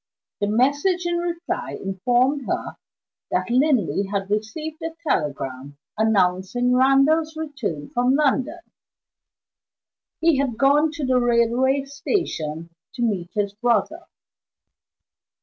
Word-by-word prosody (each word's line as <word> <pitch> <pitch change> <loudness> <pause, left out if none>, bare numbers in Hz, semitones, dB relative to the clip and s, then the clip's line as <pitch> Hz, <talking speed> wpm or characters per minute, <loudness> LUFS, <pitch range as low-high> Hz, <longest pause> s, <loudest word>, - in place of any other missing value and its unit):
The 205 - 0
message 285 - +1
in 345 0 0
reply 345 0 -3
informed 245 +9 0
her - - -3 0.5
that - - -1
Linley 240 - +2
had 200 -1 -2
received 300 +10 -3
a 325 0 -5
telegram 140 - -2 0.2
announcing 210 +3 +1
Randal's 275 +5 +3
return 260 - -5
from 250 +2 +2
London. 295 +3 +1 1.6
He 325 -4 +3
had 260 -5 -1
gone 285 +4 +4
to 305 -3 -3
the 255 -1 +3
railway 240 +3 +2
station 170 - -3 0.2
to 240 - -2
meet 190 -7 -1
his 205 -1 -1
brother. 235 +3 0
250 Hz, 110 wpm, -23 LUFS, 205-290 Hz, 1.6 s, gone